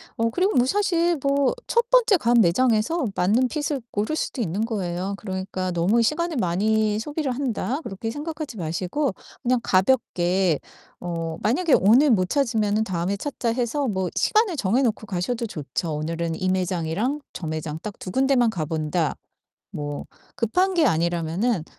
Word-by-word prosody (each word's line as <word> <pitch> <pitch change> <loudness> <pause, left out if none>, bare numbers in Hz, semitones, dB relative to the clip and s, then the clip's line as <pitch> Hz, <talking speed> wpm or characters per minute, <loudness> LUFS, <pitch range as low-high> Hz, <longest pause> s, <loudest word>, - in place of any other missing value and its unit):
어 230 0 +1
그리고 370 - +1
뭐 245 0 +4
사실 345 -1 +1
뭐 280 -1 +2
첫 475 +1 +1
번째 480 -5 +5
간 240 -3 +3
매장에서 230 - +2
맞는 225 +8 +2
핏을 295 -3 -2
고를 215 +9 -1
수도 260 - -3
있는 195 +3 -1
거예요. 190 -3 -3
그러니까 190 -2 -4
'너무 185 +7 +2
시간을 315 +5 0
많이 215 +3 +1
소비를 290 +1 -2
한다.' 265 +2 -2
그렇게 225 +1 -5
생각하지 300 0 -5
마시고 180 - -1 0.3
그냥 250 0 +2
가볍게 185 - +2 0.4
어 165 -2 -4
'만약에 280 +8 +2
오늘 250 +9 +6
못 185 -5 +2
찾으면은 220 -6 +1
다음에 185 +1 -2
찾자.' 245 -2 -2
해서 255 +3 -1
뭐 190 -3 -1
시간을 425 -4 +2
정해 240 0 +1
놓고 225 -3 0
가셔도 215 +5 -2
좋죠. 155 -2 -4
'오늘은 165 +2 -2
이 185 - 0
매장이랑 185 - -1
저 175 - -6
매장 155 0 -4
딱 210 -2 -7
2 185 - -6
군데 270 +5 +2
만 240 -2 +4
가 175 -7 -3
본다.' 155 +1 -1 0.6
뭐 145 -1 -5 0.3
급한 365 - +1
게 330 -3 +4
아니라면은 170 +3 0
220 Hz, 325 characters per minute, -24 LUFS, 180-270 Hz, 0.6 s, 오늘